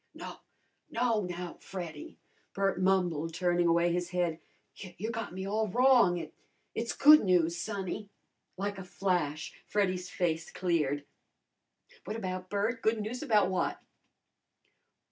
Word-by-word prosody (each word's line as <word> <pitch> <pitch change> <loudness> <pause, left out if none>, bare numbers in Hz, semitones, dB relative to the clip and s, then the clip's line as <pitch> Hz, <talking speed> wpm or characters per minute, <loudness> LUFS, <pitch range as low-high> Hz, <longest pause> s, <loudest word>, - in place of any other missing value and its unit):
"No, - - -8 0.5
no, 230 -2 +1
now, 180 -2 -5
Freddy," 170 -6 -7 0.4
Bert 195 -2 +1
mumbled, 175 -4 +1
turning 175 0 +2
away 170 +1 +3
his 175 0 -1
head. 175 -3 -1 0.3
"You 190 +3 -6
got 230 -1 -4
me 190 +1 -5
all 215 +2 0
wrong. 240 -4 +5
It 160 -3 -6 0.4
it's 230 +1 -2
good 305 +2 +8
news, 175 -3 +2
sonny." 200 +1 -4 0.5
Like 200 +1 -3
a - - -6
flash 175 -4 -1
Freddy's 185 -3 0
face 165 -3 -1
cleared. 150 -6 0 1.0
"What - - -4
about, 185 -4 -4
Bert? 215 +4 -1
Good 220 0 +2
news 220 +4 -4
about 210 -4 +3
what?" 185 - -1
185 Hz, 130 wpm, -31 LUFS, 175-210 Hz, 1.0 s, good